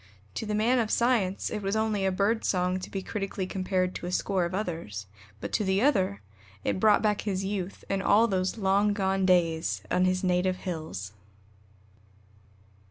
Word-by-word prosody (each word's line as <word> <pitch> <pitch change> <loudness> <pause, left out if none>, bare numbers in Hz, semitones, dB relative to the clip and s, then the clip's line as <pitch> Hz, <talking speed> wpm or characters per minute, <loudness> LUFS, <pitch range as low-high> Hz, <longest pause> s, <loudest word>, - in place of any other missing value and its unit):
To 220 - -4
the 210 - -1
man 235 +4 +3
of 225 -2 0
science 230 -6 +1
it 210 - -3
was 195 +1 -1
only 215 -3 +1
a - - +2
bird 205 +4 +1
song 180 0 +1
to 185 - -8
be 195 -1 -4
critically 195 -2 -3
compared 185 -1 -1
to 175 - -6
a - - -3
score 185 -1 0
of 170 +2 -3
others; 165 - -4 0.3
but - - -6
to - - +1
the 190 +2 +1
other 190 - +2 0.4
it - - -1
brought 210 +1 +4
back 210 -1 +1
his 195 -2 -2
youth 195 -1 -4
and 195 0 -1
all 210 +4 +4
those 190 0 -1
long 200 +1 +2
gone 195 -2 +1
days 165 - +2
on 180 - +3
his 185 0 +1
native 185 0 +2
hills! 155 - -5
190 Hz, 180 wpm, -28 LUFS, 180-210 Hz, 0.4 s, brought